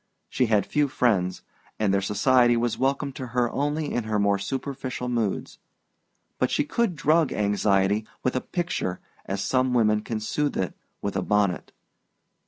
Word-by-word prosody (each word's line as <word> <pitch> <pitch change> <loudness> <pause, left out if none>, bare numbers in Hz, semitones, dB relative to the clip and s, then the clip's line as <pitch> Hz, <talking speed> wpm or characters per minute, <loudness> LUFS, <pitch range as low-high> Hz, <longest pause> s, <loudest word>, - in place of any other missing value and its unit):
She 125 - +1
had 105 -3 +2
few 150 -1 +1
friends, 100 -9 +1 0.3
and 105 -3 +1
their 100 - +2
society 120 +4 +3
was 120 0 0
welcome 140 +1 0
to 130 -1 -7
her 120 -1 +2
only 145 +2 -1
in 120 -2 -1
her 110 -1 0
more 100 -1 +2
superficial 130 +3 -4
moods; 115 -5 -2 0.8
but - - +2
she - - +1
could 210 +4 0
drug 155 0 +3
anxiety 100 0 +1 0.2
with 130 - 0
a 130 - +1
picture 175 - -2 0.3
as 100 0 -2
some 130 -1 +1
women 105 -2 +3
can 110 0 -3
soothe 145 +7 -1
it 95 - -2 0.3
with 100 - -2
a 95 - +1
bonnet. 100 -2 0
120 Hz, 165 wpm, -25 LUFS, 100-135 Hz, 0.8 s, society